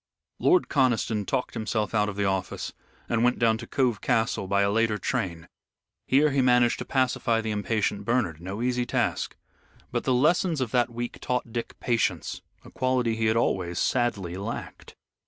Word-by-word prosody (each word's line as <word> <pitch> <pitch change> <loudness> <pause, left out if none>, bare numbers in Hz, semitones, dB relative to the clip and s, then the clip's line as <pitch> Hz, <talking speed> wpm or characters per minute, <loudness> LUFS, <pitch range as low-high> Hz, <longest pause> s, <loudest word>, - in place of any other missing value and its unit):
Lord 360 -1 +4
Conniston 115 -6 +1
talked 130 -2 -1
himself 110 -1 -2
out 105 -1 +2
of 100 - -6
the 100 0 0
office, 95 -1 -2 0.3
and 115 0 +1
went 125 0 +3
down 115 -1 +2
to - - -8
Cove 125 -6 0
Castle 110 -3 0
by 100 +1 +2
a 100 - +2
later 110 0 +2
train. 85 -3 -3 0.6
Here 145 +3 +4
he 135 0 +2
managed 125 -2 +4
to - - -4
pacify 125 -3 +1
the 110 -1 -2
impatient 105 -1 -1
Bernard, 100 -9 0
no 100 +6 -4
easy 125 -1 0
task. - - -1 0.6
But - - -1
the 130 - +2
lessons 160 +4 +2
of 125 -4 -2
that 120 -1 +2
week 120 0 -5
taught 125 -2 -2
Dick 115 - -5
patience, 110 - -1 0.2
a - - -13
quality 125 -3 0
he 110 0 0
had 110 +1 +2
always 90 -6 0
sadly 100 -9 0
lacked. 105 +4 -7
115 Hz, 175 wpm, -26 LUFS, 100-125 Hz, 0.6 s, Lord